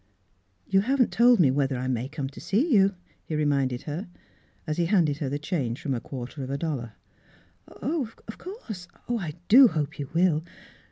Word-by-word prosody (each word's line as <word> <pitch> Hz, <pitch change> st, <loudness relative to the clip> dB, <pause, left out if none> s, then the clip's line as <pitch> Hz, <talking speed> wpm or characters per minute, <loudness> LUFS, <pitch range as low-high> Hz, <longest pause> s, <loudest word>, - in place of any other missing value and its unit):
" 95 Hz, -1 st, -42 dB
You 195 Hz, -, +5 dB
haven't 255 Hz, 0 st, +2 dB
told 235 Hz, +4 st, +5 dB
me 145 Hz, -7 st, +5 dB
whether 135 Hz, -1 st, 0 dB
I 130 Hz, +1 st, -3 dB
mav 125 Hz, 0 st, -1 dB
come 145 Hz, -2 st, -4 dB
to 135 Hz, -, -11 dB
see 255 Hz, -, +1 dB
you," 195 Hz, -2 st, +5 dB, 0.3 s
he 155 Hz, -, -4 dB
reminded 140 Hz, -4 st, +1 dB
her, 160 Hz, +7 st, -5 dB, 0.6 s
as 155 Hz, -2 st, -2 dB
he 170 Hz, -1 st, +1 dB
handed 165 Hz, -7 st, +2 dB
her 140 Hz, -, -2 dB
the 145 Hz, -, -1 dB
change 145 Hz, -6 st, -2 dB
from 140 Hz, -, -2 dB
a 120 Hz, -, -2 dB
quarter 130 Hz, +2 st, -7 dB
of 130 Hz, -, -6 dB
a 140 Hz, -, -1 dB
dollar. 140 Hz, -8 st, -3 dB, 0.5 s
" -, -, -21 dB
Oh, 280 Hz, -5 st, -1 dB, 0.2 s
of 220 Hz, -, -8 dB
course. 230 Hz, -, -8 dB, 0.2 s
I 195 Hz, -11 st, -2 dB
do 255 Hz, +5 st, +9 dB
hope 155 Hz, -8 st, -3 dB
you 140 Hz, -2 st, -4 dB
will. 165 Hz, -2 st, +2 dB
155 Hz, 200 wpm, -26 LUFS, 135-200 Hz, 0.6 s, do